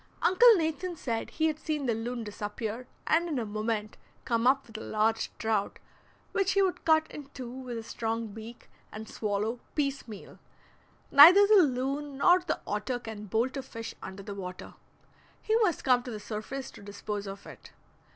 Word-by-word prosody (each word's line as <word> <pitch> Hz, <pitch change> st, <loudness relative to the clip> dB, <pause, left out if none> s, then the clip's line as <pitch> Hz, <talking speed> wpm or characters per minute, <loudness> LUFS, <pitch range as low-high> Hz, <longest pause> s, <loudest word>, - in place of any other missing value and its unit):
Uncle 460 Hz, +5 st, +7 dB
Nathan 340 Hz, +1 st, -2 dB
said 230 Hz, -7 st, -3 dB
he 315 Hz, -, -1 dB
had 310 Hz, -1 st, 0 dB
seen 305 Hz, -3 st, -2 dB
the 240 Hz, -, +1 dB
loon 235 Hz, +2 st, -4 dB
disappear 210 Hz, +3 st, -5 dB, 0.2 s
and 340 Hz, +2 st, +2 dB
in 300 Hz, -, -1 dB
a 235 Hz, -, -1 dB
moment 215 Hz, 0 st, -3 dB, 0.3 s
come 230 Hz, 0 st, +1 dB
up 270 Hz, +1 st, +3 dB
with 220 Hz, -1 st, -9 dB
a -, -, -8 dB
large 220 Hz, +1 st, 0 dB
trout, 220 Hz, -3 st, -1 dB, 0.5 s
which 390 Hz, -1 st, +1 dB
he 395 Hz, -, +3 dB
would 370 Hz, -2 st, -1 dB
cut 315 Hz, -1 st, +4 dB
in 290 Hz, -2 st, -8 dB
two 255 Hz, -3 st, -6 dB
with 255 Hz, -2 st, -6 dB
his 225 Hz, -, -7 dB
strong 225 Hz, 0 st, -3 dB
beak, 225 Hz, +2 st, -10 dB, 0.2 s
and 215 Hz, +1 st, -8 dB
swallow 215 Hz, +3 st, -2 dB, 0.2 s
piecemeal. 275 Hz, -8 st, -4 dB, 0.7 s
Neither 350 Hz, +8 st, +10 dB
the 415 Hz, -1 st, +7 dB
loon 275 Hz, 0 st, -1 dB
nor 355 Hz, +5 st, +5 dB
the 355 Hz, -3 st, -3 dB
otter 210 Hz, +4 st, -2 dB
can 220 Hz, -3 st, -8 dB
bolt 230 Hz, +7 st, 0 dB
a 270 Hz, -, -2 dB
fish 230 Hz, -3 st, -8 dB
under 190 Hz, +1 st, -8 dB
the 205 Hz, 0 st, -6 dB
water; 185 Hz, -2 st, -7 dB, 0.7 s
he 440 Hz, -, 0 dB
must 415 Hz, -8 st, +1 dB
come 250 Hz, -2 st, +4 dB
to 245 Hz, -, -8 dB
the 215 Hz, -3 st, -5 dB
surface 230 Hz, +6 st, -6 dB
to -, -, -13 dB
dispose 205 Hz, 0 st, -5 dB
of 195 Hz, 0 st, -8 dB
it. -, -, -12 dB
240 Hz, 180 wpm, -29 LUFS, 215-295 Hz, 0.7 s, Neither